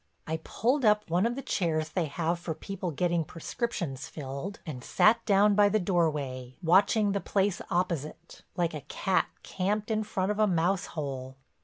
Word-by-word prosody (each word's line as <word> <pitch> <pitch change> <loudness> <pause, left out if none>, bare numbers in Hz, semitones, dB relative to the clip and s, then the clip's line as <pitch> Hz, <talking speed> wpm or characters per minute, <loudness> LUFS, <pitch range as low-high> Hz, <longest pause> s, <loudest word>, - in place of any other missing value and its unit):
I 160 +1 -2
pulled 250 - 0
up 210 -1 +4
one 180 +6 +3
of 240 - -2
the 275 - -5
chairs 155 -7 0
they 170 +1 0
have 165 +3 -1
for 165 -2 -4
people 190 0 -5
getting 170 +2 0
prescriptions 165 - -4
filled, 140 +7 -6
and 130 -7 -6
sat 220 +2 +4
down 205 0 +5
by 205 0 +5
the 215 - +2
doorway, 150 -9 -1
watching 200 +4 +4
the 200 0 -1
place 195 -1 0
opposite, 170 -2 -2
like 175 -2 0
a 150 - -5
cat 190 +6 0 0.2
camped 210 +4 -1
in 215 0 +1
front 195 -1 -1
of 210 - -3
a 215 - +5
mouse 180 +1 +1
hole. 135 -3 -4
180 Hz, 175 wpm, -29 LUFS, 155-205 Hz, 0.2 s, down